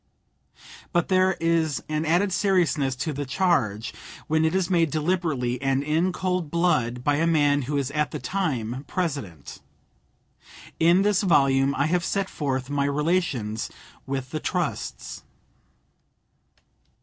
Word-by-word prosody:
But 175 -2 +1
there 185 0 +3
is 165 -3 +1
an 155 +1 -1
added 180 +4 +2
seriousness 160 -10 +1
to 150 +4 -3
the 145 +1 -3
charge 125 - 0 0.3
when 155 +1 +1
it 160 +3 +1
is 190 -2 +1
made 170 -4 +2
deliberately 155 -6 -1
and 135 0 +1
in 160 +5 +1
cold 180 -3 -2
blood 130 -8 +1
by 145 +1 +2
a 165 +2 +2
man 145 -3 +3
who 145 +3 -2
is 140 -1 -1
at 150 +1 0
the - - -5
time 130 - -2
President. 135 - -4 1.2
In 170 +4 +5
this 205 -2 +2
volume 135 -7 +3
I 140 - +1
have 175 +2 +1
set 195 +2 -1
forth 130 -3 -2
my 140 0 0
relations 140 -7 -1 0.4
with 135 -1 -4
the 155 - -2
trusts. 175 -1 -3
155 Hz, 135 wpm, -25 LUFS, 135-175 Hz, 1.2 s, In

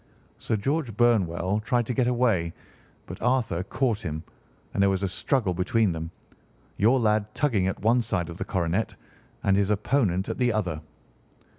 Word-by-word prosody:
Sir - - -1
George 125 +1 -1
Burnwell 100 -5 +2
tried 120 +2 0
to 125 - -2
get 125 0 +1
away, 115 -10 +1 0.5
but - - -9
Arthur 120 -8 +1
caught 115 +3 -1
him, 80 -5 -5 0.5
and 100 - 0
there 100 - +5
was 95 0 0
a - - +2
struggle 100 +1 0
between 95 +4 +1
them, 80 0 -4 0.7
your 120 +6 +4
lad 105 -2 +1
tugging 110 -11 +1
at 95 - -3
one 120 +3 +4
side 100 -7 -2
of 85 0 -8
the - - -2
coronet, 95 +3 -1 0.5
and 95 - +3
his 100 0 +2
opponent 105 -3 +1
at - - -4
the 125 -1 +3
other. 90 -8 -2
105 Hz, 170 wpm, -26 LUFS, 90-120 Hz, 0.7 s, there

